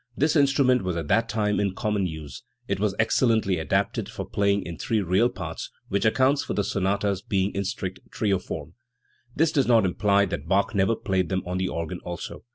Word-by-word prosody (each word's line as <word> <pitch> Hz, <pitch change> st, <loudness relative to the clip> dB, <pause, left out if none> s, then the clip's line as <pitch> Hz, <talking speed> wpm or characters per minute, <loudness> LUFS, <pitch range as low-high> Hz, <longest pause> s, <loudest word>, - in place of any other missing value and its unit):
This 150 Hz, +3 st, +2 dB
instrument 135 Hz, -4 st, +4 dB
was 90 Hz, -2 st, -2 dB
at 80 Hz, -3 st, -4 dB
that 115 Hz, 0 st, +2 dB
time 105 Hz, -1 st, 0 dB
in 100 Hz, -2 st, 0 dB
common 105 Hz, -3 st, 0 dB
use. 80 Hz, -5 st, -8 dB, 0.3 s
It 100 Hz, -1 st, -1 dB
was 100 Hz, -2 st, 0 dB
excellently 110 Hz, -4 st, +2 dB
adapted 80 Hz, -, -1 dB
for -, -, -6 dB
playing 100 Hz, 0 st, +1 dB
in 85 Hz, -2 st, -7 dB
three 110 Hz, -, 0 dB
real 95 Hz, +5 st, +2 dB
parts, 90 Hz, -5 st, -6 dB, 0.2 s
which 100 Hz, +3 st, 0 dB
accounts 135 Hz, +5 st, +3 dB
for -, -, -4 dB
the 100 Hz, -, +1 dB
sonatas 100 Hz, 0 st, 0 dB
being 100 Hz, -1 st, 0 dB
in 100 Hz, -, -1 dB
strict 95 Hz, -2 st, -4 dB
trio 100 Hz, -4 st, 0 dB
form. 80 Hz, -3 st, -7 dB, 0.6 s
This 160 Hz, 0 st, +3 dB
does 140 Hz, -4 st, +2 dB
not 115 Hz, -4 st, +5 dB
imply 100 Hz, +2 st, +2 dB
that 80 Hz, -5 st, -5 dB
Bach 95 Hz, +2 st, +2 dB
never 100 Hz, +3 st, +2 dB
played 95 Hz, -4 st, -1 dB
them 95 Hz, -1 st, -1 dB
on 90 Hz, +1 st, -2 dB
the 95 Hz, -, 0 dB
organ 85 Hz, +2 st, -4 dB
also. 85 Hz, -1 st, -6 dB
100 Hz, 200 wpm, -25 LUFS, 90-110 Hz, 0.6 s, not